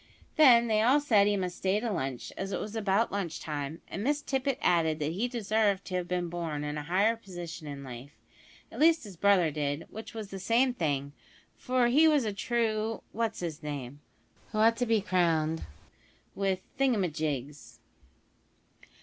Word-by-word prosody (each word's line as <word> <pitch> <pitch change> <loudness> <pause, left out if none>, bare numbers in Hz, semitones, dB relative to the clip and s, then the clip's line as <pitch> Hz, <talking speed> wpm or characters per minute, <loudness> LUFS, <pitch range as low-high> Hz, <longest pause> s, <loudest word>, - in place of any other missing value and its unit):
Then 245 -6 +7
they 215 -2 +2
all 255 +6 +5
said 220 -9 +4
he 205 0 +2
must 180 -2 -3
stay 190 +2 +1
to 230 0 -2
lunch, 130 -8 -4
as 195 +1 -4
it - - -2
was 215 +1 -6
about 215 +1 +1
lunchtime, 160 -5 -4
and 195 - -5
Miss 290 +3 0
Tippet 270 -2 -1
added 160 -3 +2
that 150 0 -2
he 205 +9 -1
deserved 215 -4 0
to 185 - -5
have 180 -1 -2
been 180 -1 -1
born 165 -4 -4
in 150 0 -3
a 150 - -3
higher 190 +9 +2
position 175 -7 -8
in 140 -1 -7
life 130 +2 -10 0.5
at - - -9
least 320 0 +5
his 200 -4 -10
brother 180 -3 +3
did, 145 +1 -2
which 220 +2 -9
was 215 -3 -6
the 195 - -6
same 240 +6 +2
thing, 145 - -2 0.4
for 250 -1 +1
he 290 +7 +5
was 295 -6 +3
a 210 - -2
true 225 0 -1
what's 225 -4 -2
'is 160 -3 -4
name, 145 -2 -6 0.5
who - - -4
ought 225 +1 +4
to 245 - 0
be 225 -2 +3
crowned 165 -4 +1 0.7
with 195 -1 -1 0.2
thingumyjigs. 155 - -1
195 Hz, 175 wpm, -29 LUFS, 160-230 Hz, 0.7 s, Then